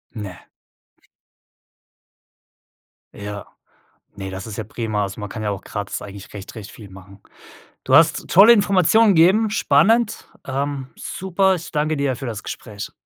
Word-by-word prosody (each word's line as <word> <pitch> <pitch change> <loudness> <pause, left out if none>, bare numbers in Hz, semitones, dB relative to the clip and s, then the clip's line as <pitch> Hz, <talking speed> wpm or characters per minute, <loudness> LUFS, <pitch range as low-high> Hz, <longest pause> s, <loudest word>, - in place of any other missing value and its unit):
Ne. 100 -5 -8 2.7
Ja. 100 0 -7 0.7
Ne, 95 -1 -6
das 95 0 -7
ist 110 -3 -8
ja 110 - -3
prima. 110 -1 -3
Also, 95 +1 -6
man 105 - -6
kann 110 - -6
ja 105 - -1
auch 100 -2 -5
gratis 105 -1 -5
eigentlich 100 -1 -10
recht 100 -1 -9
recht 105 -3 -9
viel 105 -3 -13
machen. 100 +1 -14 0.7
Du - - +2
hast - - +4
tolle 200 +6 +8
Informationen 200 0 +4
gegeben, 190 +7 +4
spannend. 215 +6 +2 0.2
Ähm, 140 0 -3
super, 190 +1 0
ich 170 -2 -7
danke 155 0 0
dir 140 -3 -1
für 135 +1 -7
das 115 -2 -5
Gespräch. 105 -3 -8
115 Hz, 145 wpm, -21 LUFS, -, 2.7 s, tolle